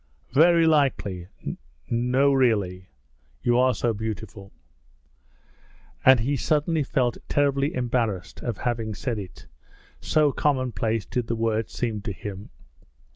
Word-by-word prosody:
'Very 165 +3 +5
likely!' 135 - +1 0.6
'No 125 +4 +2
really. 100 -8 +1 0.5
You 120 0 +3
are 130 0 +3
so 120 -1 0
beautiful!' 105 -2 -6 1.5
And 130 -3 +7
he 140 +5 0
suddenly 155 +4 +1
felt 125 -3 0
terribly 140 0 +1
ashamed 120 -6 -2
of 120 -4 -3
having 115 -3 -2
said 115 +1 -3
it, 95 -3 -10 0.5
so 150 -2 +2
commonplace 125 -7 0
did 125 -2 -3
the 115 - -1
words 115 -1 -1
seem 110 -4 -2
to 100 0 -4
him. 100 +1 -8
120 Hz, 120 wpm, -25 LUFS, 110-135 Hz, 1.5 s, And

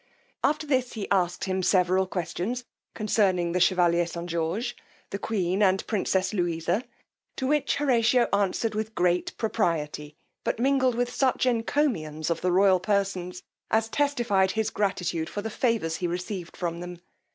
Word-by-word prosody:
After 305 +1 +1
this 260 -4 0
he 215 -3 -4
asked 180 -2 +1
him 190 -1 -1
several 185 0 +3
questions 190 +7 -3 0.3
concerning 195 -5 +1
the 180 - 0
chevalier 175 -2 +3
St. 170 0 -6
George, 175 +9 -2 0.4
the 200 - -3
queen, 190 -3 -1
and 190 -1 +3
princess 190 -2 0
Louisa; 175 +2 0 0.5
to 260 - -3
which 295 +2 +1
Horatio 245 -3 +3
answered 200 +3 +1
with 220 +1 -3
great 180 0 +1
propriety, 155 -9 -1 0.3
but - - -1
mingled 260 0 +2
with 245 +1 -1
such 260 -2 +1
encomiums 225 - 0
of 165 - -1
the 180 - +1
royal 190 0 +5
persons, 185 -2 -1 0.3
as 220 0 +1
testified 240 -9 +2
his 220 -1 -1
gratitude 180 -5 -1
for 205 - -5
the 225 - -4
favours 215 -10 0
he 180 - -1
received 180 0 -5
from 170 -1 -3
them. 175 0 -7
190 Hz, 150 wpm, -26 LUFS, 175-230 Hz, 0.5 s, royal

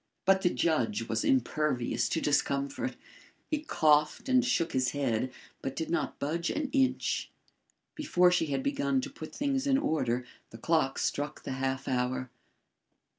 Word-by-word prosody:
But 190 0 +4
the 180 - +3
judge 170 +6 0
was - - -1
impervious 150 - +1
to 165 - 0
discomfort. 140 - 0 0.6
He 305 - +1
coughed 150 - +2
and 255 -1 +4
shook 215 -10 +1
his 130 -1 +1
head, 130 -3 0 0.3
but 135 0 -4
did 160 - -3
not 170 - -1
budge 170 +4 -2
an 290 -3 -2
inch. 265 -2 +1 0.6
Before 180 - +3
she 180 -3 +2
had 135 -2 -1
begun 140 -1 +1
to - - -6
put 155 - -9
things 275 -1 0
in 270 -1 +4
order, 125 - 0 0.2
the 115 - -11
clock 155 +1 +1
struck 145 +1 -2
the - - -5
half 130 0 -2
hour. 130 0 -1
155 Hz, 155 wpm, -30 LUFS, 135-220 Hz, 0.6 s, But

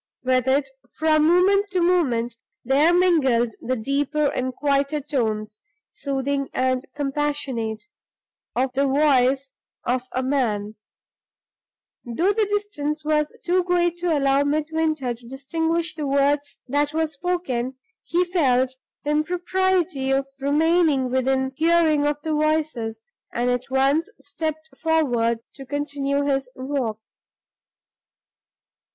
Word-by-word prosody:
With 255 0 +2
it, 275 +1 +2 0.3
from 310 -1 +3
moment 390 +4 +4
to 370 - +2
moment, 265 -10 +1 0.3
there 285 +6 +4
mingled 275 -11 +3
the 255 +2 -1
deeper 280 +5 0
and 255 0 -2
quieter 280 +2 0
tones, 220 -7 -2 0.3
soothing 275 0 -2
and 255 0 +1
compassionate, 275 -6 -2 0.7
of 255 +1 0
the 275 +1 +2
voice 270 -1 +3 0.3
of 250 +1 +1
a 255 - -1
man. 220 -6 0 1.3
Although 340 - +1
the 430 -1 +1
distance 310 -8 -2
was 300 -1 +1
too 360 +1 +2
great 350 -1 +1
to 345 -3 +1
allow 275 0 +3
Midwinter 310 -2 0
to 235 0 -15
distinguish 325 +5 -2
the 300 -2 -4
words 280 +1 +1
that 290 +3 0
were 320 0 +2
spoken, 285 -6 -3 0.3
he 355 +1 +1
felt 260 -8 +2 0.3
the 295 - -1
impropriety 350 -2 0
of 270 0 +1
remaining 295 -2 +2
within 265 +1 +1
hearing 315 -2 +3
of 295 0 0
the 315 - -1
voices, 305 - -1 0.3
and 245 +1 0
at 245 +1 -2
once 275 +7 +2
stepped 315 0 -5
forward 245 -8 +1
to 270 - -10
continue 285 0 -2
his 270 -2 0
walk. 260 -5 -2
285 Hz, 120 wpm, -23 LUFS, 260-320 Hz, 1.3 s, moment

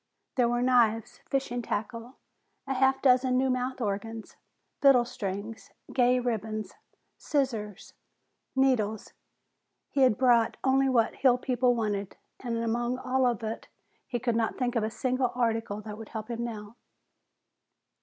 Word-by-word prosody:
There 245 -2 +3
were 240 0 0
knives, 230 -3 +2
fishing 255 -3 -1
tackle, 230 +3 -4 0.5
a 270 - -2
half 265 +1 +2
dozen 255 -1 +4
new 260 0 +2
mouth 255 +1 -2
organs, 220 0 -4 0.5
fiddle 270 -4 +6
strings, 205 0 -6 0.2
gay 250 0 +3
ribbons, 220 -3 -3 0.5
scissors, 225 - -2 0.6
needles 240 -6 +1 0.8
He 275 - +1
had 255 -5 +5
bought 240 -3 +3
only 270 0 +3
what 230 -3 +3
the - - -18
hill 255 -3 +4
people 250 -1 +1
wanted, 205 -4 -2 0.2
and 235 -2 -3
among 240 +2 -1
all 255 0 +1
of 235 -2 -1
it 220 +1 -5 0.4
he 245 - -2
could 235 -1 -1
not 225 -1 0
think 250 -1 -1
of 230 - +2
a 215 - 0
single 250 +2 -1
article 225 -3 -1
that 210 0 -8
would 225 - -9
help 220 +1 -6
him 235 0 -3
now. 220 -1 -7
240 Hz, 145 wpm, -28 LUFS, 220-255 Hz, 0.8 s, fiddle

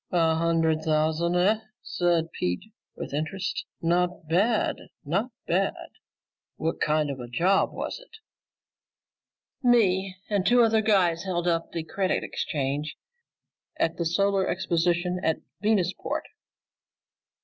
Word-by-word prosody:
"A 165 -2 +3
hundred 165 -1 +1
thousand, 160 +2 +1
eh?" 200 +5 +3 0.2
said 170 -2 0
Pete 90 - -3 0.2
with - - -7
interest. 160 +6 -3 0.2
"Not 175 -1 0
bad, 205 +8 +2 0.3
not 195 - 0 0.2
bad. 190 +3 -1 0.7
What 160 +1 -2
kind 150 -1 +2
of 135 - -6
a 120 - -6
job 175 +11 +2
was - - -4
it?" - - -17 1.5
"Me 195 -7 +3
and 200 -3 +1
two 240 +5 +5
other 225 -1 +3
guys 185 -6 +3
held 175 -2 -1
up 165 -1 0
the 165 -2 -3
Credit 190 +3 -1
Exchange 145 -1 -3 0.8
at 165 - 0
the 170 - -1
Solar 195 +2 +2
Exposition 175 0 0
at 160 - +2 0.2
Venusport." 200 -4 0
175 Hz, 120 wpm, -26 LUFS, 160-195 Hz, 1.5 s, two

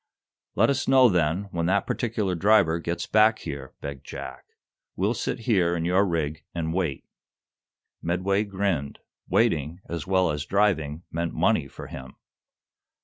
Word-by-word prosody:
"Let - - +4
us 135 -1 -1
know, 130 -2 +6
then, 85 0 +1
when 85 -1 -1
that 100 +2 +2
particular 110 -5 -1
driver 85 -2 +3
gets 85 0 -3
back 110 +1 +4
here," 70 -7 -7
begged 70 -2 -6
Jack. - - -8 0.5
"We'll 100 +5 +1
sit 125 - -3
here 95 -8 +2
in 85 -1 -2
your 95 +3 +3
rig 80 -3 -2
and 80 -1 -2
wait." 85 -7 -2 1.0
Medway 95 +4 0
grinned. 95 -8 -2 0.3
Waiting, 80 +3 +1
as 85 0 -5
well 95 -3 +2
as 75 -1 -3
driving, 85 -6 +1
meant 85 0 -3
money - - +2
for - - -10
him. 65 -1 -9
85 Hz, 145 wpm, -26 LUFS, 80-100 Hz, 1.0 s, know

